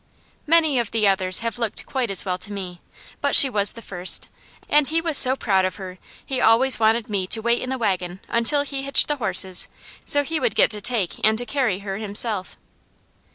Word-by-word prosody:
Many 315 -4 +2
of 235 -3 -4
the 215 -2 -1
others 185 -1 +1
have 230 +1 -5
looked 230 -3 -4
quite 260 -4 -4
as 195 0 +1
well 185 -1 -4
to 205 - -8
me, 185 -3 -8 0.4
but - - 0
she 270 -3 +7
was 205 -3 +1
the 230 - -13
first, 180 -1 0 0.4
and 295 -1 +2
he 325 +1 0
was 330 -2 -3
so 260 -1 +7
proud 195 -7 -1
of 185 -1 -3
her 185 -2 -11 0.3
he 265 -2 -4
always 245 +3 +3
wanted 225 +1 0
me 200 -4 -4
to 220 - +1
wait 235 +2 -1
in 255 - -6
the 265 - -3
wagon 185 -5 -4
until 235 +5 +1
he 275 -1 -6
hitched 275 0 +2
the 295 - -3
horses, 190 -5 +3 0.4
so 290 0 +1
he 315 +2 -3
would 215 - -2
get - - +3
to 210 -1 +1
take 210 -5 0
and 220 +1 +2
to 245 - -4
carry 245 -8 -2
her 195 -1 -5
himself. 210 -1 0
225 Hz, 215 wpm, -21 LUFS, 195-260 Hz, 0.4 s, she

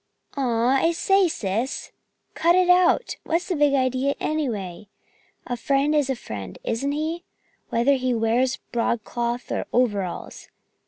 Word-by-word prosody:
"Aw, 255 -1 +2
I 335 - +4
say, 385 +3 +3
Sis, 230 - -3 0.4
cut 340 +2 +3
it 365 -1 +5
out! 360 0 +3
What's 335 +4 -1
the 360 - 0
big 290 -2 +3
idea, 260 +1 +1
anyway? 215 - -3 0.6
A 245 - -2
friend 275 +4 +1
is 295 -3 +2
a 265 - +1
friend, 100 - -7
isn't 255 +5 -1
he, 320 +3 -3 0.5
whether 240 +4 +3
he 255 -1 0
wears 240 +3 +1
broadcloth 235 +1 -2
or - - -2
overalls?" 205 -8 -1
260 Hz, 140 wpm, -24 LUFS, 235-300 Hz, 0.6 s, it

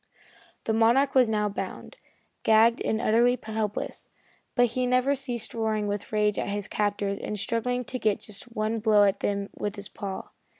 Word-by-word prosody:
The 220 - 0
Monarch 235 +5 +4
was 255 -4 +5
now 210 -1 +1
bound, 200 - -6 0.5
gagged 225 +1 +5
and 220 - 0
utterly 240 +2 +3
helpless, 215 -1 -3 0.5
but 245 -1 +4
he 255 0 0
never 255 +2 +3
ceased 245 -4 -5
roaring 220 -2 0
with 205 -1 -4
rage 210 -1 +1
at - - -2
his 205 0 -2
captors 205 -1 -1
and 210 - -4
struggling 245 +4 -1
to 255 - -5
get 215 -3 +1
just 210 -1 -8
one 225 -1 -2
blow 210 -1 +5
at 200 0 +2
them 200 0 -1
with 205 0 -3
his 200 -1 -7
paw. 195 -2 -6
220 Hz, 175 wpm, -27 LUFS, 205-240 Hz, 0.5 s, was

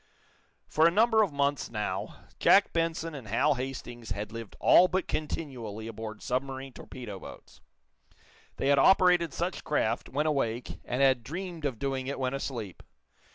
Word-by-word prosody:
For 160 +2 +4
a - - +6
number 220 +4 +4
of 200 -6 +2
months, 140 0 0
now, 105 -2 -4 0.2
Jack - - +5
Benson 165 -1 -1
and 135 -7 -8
Hal 115 +8 +3
Hastings 125 -3 -6
had 105 +1 -4
lived 115 -1 -8
all 180 - +7
but 185 0 -1
continually 125 -9 -4
aboard 110 -1 -7
submarine 135 +1 -3
torpedo 115 -7 -8
boats. - - -13 0.9
They 135 - 0
had 140 -1 +5
operated 180 0 +5
such 175 +6 -3
craft, 115 -6 0
when 150 +3 -1
awake, 125 -6 -1
and 125 +3 0
had 130 -2 +4
dreamed 170 +3 -6
of 130 -5 -1
doing 135 0 -2
it 140 - -3
when 130 0 -1
asleep. 120 -9 -5
135 Hz, 155 wpm, -29 LUFS, 120-160 Hz, 0.9 s, all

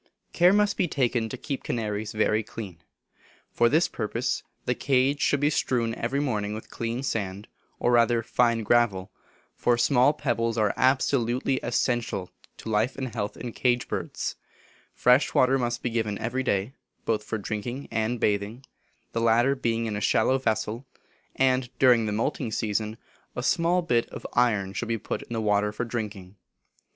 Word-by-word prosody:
Care 175 +1 +5
must 205 0 +2
be 180 - +2
taken 120 -6 0
to - - -6
keep 140 -3 -4
canaries 105 -2 -3
very 110 0 +1
clean. 100 -5 -9 0.7
For 120 - +3
this 160 +6 +3
purpose, 115 +3 -2 0.2
the 125 - +1
cage 135 +2 +1
should 145 - +2
be 145 +1 +2
strewed 120 -6 0
every 120 +5 -2
morning 105 -7 -1
with 110 - -9
clean 115 +3 -3
sand, 100 -5 -3 0.3
or 120 - +1
rather, 120 -1 +3
fine 115 -1 +1
gravel, 105 -4 +2 0.4
for 120 -1 +1
small 125 +2 +4
pebbles 115 -5 -1
are 105 -2 +2
absolutely 130 -1 +1
essential 120 -6 -1 0.3
to - - -8
life 110 +4 +1
and 130 -3 -5
health 105 -3 -3
in 120 -2 -6
cage 125 -1 +1
birds: - - -4 0.6
fresh 125 +3 +3
water 130 +1 +4
must 120 -1 -2
be 120 - -1
given 110 -3 -1
every 120 +5 -2
day, 105 -1 -1 0.3
both 110 -2 0
for 110 - -3
drinking 110 +6 -5
and 115 +2 -1
bathing; 105 +5 -1 0.5
the 115 - -2
latter 115 +4 +4
being 115 -3 -1
in 110 -2 -3
a 105 - -3
shallow 115 +5 +2
vessel; 110 0 -1 0.5
and, 130 -1 +2
during 120 -4 +5
the - - -1
moulting 110 +1 -1
season, 110 0 -2 0.4
a - - -3
small 175 +2 +2
bit 120 -8 +1
of - - -9
iron 105 -6 +2
should - - -3
be 115 0 0
put 105 - -4
into - - -9
the 115 - -1
water 105 -1 +2
for 115 +3 -3
drinking. 105 -5 -5
115 Hz, 170 wpm, -26 LUFS, 110-130 Hz, 0.7 s, Care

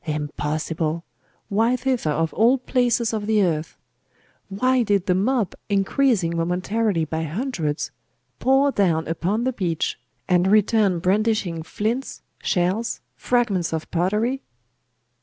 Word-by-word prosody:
Impossible! 155 +2 -2 0.4
Why 225 +4 +2
thither 255 -8 -1
of 160 +2 0
all 235 +5 +4
places 245 -3 +1
of 210 -1 -2
the 215 -2 +3
earth? 160 -3 -1 0.7
Why 255 +6 +2
did 200 -4 +1
the 185 - +2
mob, 215 +3 +1 0.2
increasing 200 -3 +2
momentarily 180 +2 0
by 160 +1 -3
hundreds, 160 - -2 0.5
pour 270 +2 +3
down 170 -8 +1
upon 180 +8 -1
the 260 +1 0
beach, 170 - -2 0.3
and 180 0 +3
return 210 -2 +3
brandishing 190 -1 0
flints, 220 +10 -3 0.2
shells, 185 +6 0 0.2
fragments 210 -9 0
of 160 -1 -4
pottery? 210 +10 0
200 Hz, 120 wpm, -23 LUFS, 165-230 Hz, 0.7 s, all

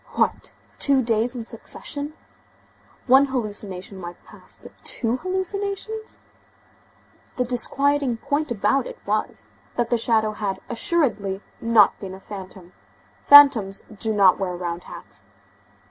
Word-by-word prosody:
What! - - -1 0.3
Two 275 -2 +4
days 230 +2 0
in 235 -2 -6
succession! 285 +5 -6 0.9
One 270 +2 +5
hallucination 205 -6 -4
might 175 0 -9
pass, - - -11
but - - -14
two 235 0 +1
hallucinations? 395 +5 -4 1.2
The 250 - 0
disquieting 270 +1 +2
point 290 +6 -2
about 235 +4 +1
it - - -9
was, 215 +1 -3 0.3
that 240 0 -1
the 240 - +2
shadow 220 -2 +1
had 200 -3 -4
assuredly 230 - -1 0.2
not 230 -3 +4
been 190 -2 -7
a - - -12
phantom. 190 -2 -10 0.5
Phantoms 250 -9 +7
do 220 +2 0
not 200 -3 +4
wear 185 -2 -2
round 175 0 -5
hats. 105 -1 -12
230 Hz, 125 wpm, -23 LUFS, 195-275 Hz, 1.2 s, Phantoms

